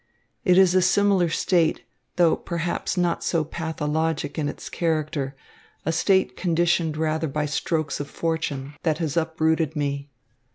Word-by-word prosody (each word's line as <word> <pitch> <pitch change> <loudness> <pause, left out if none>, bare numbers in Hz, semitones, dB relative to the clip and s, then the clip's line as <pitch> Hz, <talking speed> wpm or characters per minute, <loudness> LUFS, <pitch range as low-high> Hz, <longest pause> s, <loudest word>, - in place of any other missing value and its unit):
It 180 -5 +4
is 190 -2 +6
a 185 - +4
similar 190 -1 +3
state, 165 0 +1 0.3
though 170 -2 +4
perhaps 170 +2 -3
not 175 -1 +1
so 165 -3 +1
pathologic 160 -1 -2
in 145 -1 0
its - - -8
character, 155 -4 -1 0.5
a 160 - +1
state 165 -4 +2
conditioned 170 -2 +1
rather 160 0 0
by 150 +1 -1
strokes 155 +1 -1
of 145 -1 -5
fortune, 150 -4 -3
that 160 -3 +1
has 155 -4 -2
uprooted 160 -1 +1
me. 140 -1 -2
160 Hz, 140 wpm, -24 LUFS, 150-170 Hz, 0.5 s, is